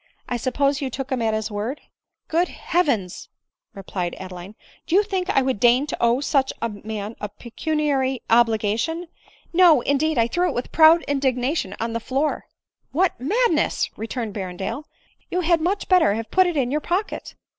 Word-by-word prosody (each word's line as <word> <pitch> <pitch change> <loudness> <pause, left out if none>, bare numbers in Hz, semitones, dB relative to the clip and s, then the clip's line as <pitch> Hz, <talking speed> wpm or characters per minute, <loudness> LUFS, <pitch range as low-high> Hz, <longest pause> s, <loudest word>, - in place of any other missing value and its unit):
I 245 - -2
suppose 275 +4 0
you 270 - -2
took 270 +2 -6
him 255 -2 0
at 220 -1 +1
his 215 0 -3
word 215 +7 -3
¥ - - -25
9 - - -32 0.2
" - - -61
Good 340 +3 +2
Heavens 270 - -1 0.2
!" - - -62
replied 185 -2 -4
Adeline, 185 +2 -9 0.2
" - - -30
Do 335 - +1
you 405 - +6
think 380 -3 -3
I 270 -9 +3
would 260 -5 -1
deign 245 +4 +4
to - - -4
owe 235 +3 +3
such 275 -2 +1
a 230 - -1
man 210 +1 -6
a 210 - -3
pecuniary 270 +3 -2
obligation? 230 +9 +1 0.4
No, 335 -6 +6
indeed; 290 +3 +1
I 230 - +4
threw 355 +9 0
it - - -4
with 245 - -4
proud 325 +1 +6
indignation 265 - -1
on 230 0 -2
the 230 - -1
floor." 270 +6 -2 0.2
" - - -69
What 360 +5 +1
madness 345 - +1
!" - - -38
returned 225 -1 -4
Berrendale; 190 +8 -5 0.2
" - - -38
you 360 - 0
had 335 -1 +2
much 380 +5 -1
better 350 - +4
have 225 0 -5
put 370 -1 +4
it 345 -3 -2
in 255 -2 +1
your 300 +2 0
pocket." 370 +7 -3
265 Hz, 200 wpm, -23 LUFS, 225-320 Hz, 0.4 s, you